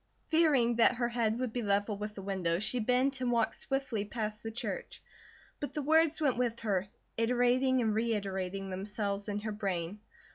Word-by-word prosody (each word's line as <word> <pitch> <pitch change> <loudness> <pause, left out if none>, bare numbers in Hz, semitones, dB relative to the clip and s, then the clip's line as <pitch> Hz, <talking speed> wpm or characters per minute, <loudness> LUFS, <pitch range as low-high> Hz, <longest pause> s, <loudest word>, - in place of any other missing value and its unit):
Fearing 280 -8 +4
that 240 +1 +5
her 240 -1 0
head 230 -2 0
would 250 -3 -2
be 245 - -1
level 205 0 +1
with 210 +1 -5
the 195 - -7
windows, 190 -2 -1
she 250 +3 +2
bent 255 +3 +1
and 250 -1 +1
walked 230 -2 +2
swiftly 270 -6 -2
past 215 0 -4
the 225 - -4
church; 240 - -5 0.6
but 290 - -5
the 300 - -1
words 320 +2 +4
went 275 -6 +2
with 240 -2 -1
her, 200 -3 0 0.3
iterating 250 +2 +3
and 220 -2 +1
reiterating 195 -4 -2
themselves 200 +1 -3
in 205 0 -2
her 215 0 -3
brain. 195 -2 -3
225 Hz, 180 wpm, -32 LUFS, 205-250 Hz, 0.6 s, that